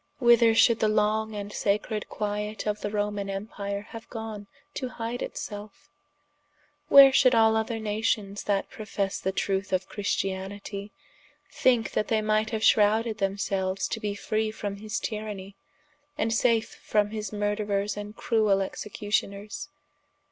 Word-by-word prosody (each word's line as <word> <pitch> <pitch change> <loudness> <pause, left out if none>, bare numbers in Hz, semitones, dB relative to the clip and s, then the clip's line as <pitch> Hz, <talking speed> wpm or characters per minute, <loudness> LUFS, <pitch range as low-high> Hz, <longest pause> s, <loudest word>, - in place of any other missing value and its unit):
whither 235 -2 +5
should 230 0 +5
the 215 - +3
long 215 +1 +1
and 205 0 -5
sacred 210 +1 -1
quiet 210 0 -3
of 210 0 -1
the 205 - -2
Romane 205 -1 -2
Empire 200 0 -4
haue 225 - -7
gone 220 -3 -6 0.3
to 255 - -3
hide 235 0 -4
it - - -5
selfe? 205 -1 -8 1.0
where 275 -1 +9
should 255 -2 +5
all 220 -1 +5
other 220 +1 -1
Nations 210 -2 -1
that 200 -1 0
professe 200 -2 -3
the 190 - -1
trueth 195 0 -1
of 185 0 0
Christianitie, 200 0 -3 0.6
thinke 245 -3 +2
that 215 - 0
they 220 - +2
might 215 0 +1
haue 220 - -1
shrowded 215 +1 +3
them 195 0 0
selues 190 -1 -1
to - - -3
be 205 -1 -3
free 215 +1 -1
from 205 -2 -5
his 215 +1 -3
tyrannie, 210 -3 -5 0.6
and 225 -6 0
safe 230 -1 +1
from 210 -1 +1
his 215 -2 -4
murderers 205 -1 -1
and 205 +1 -7
cruel 215 -5 +2
executioners? 205 +6 -3
210 Hz, 150 wpm, -27 LUFS, 200-220 Hz, 1.0 s, where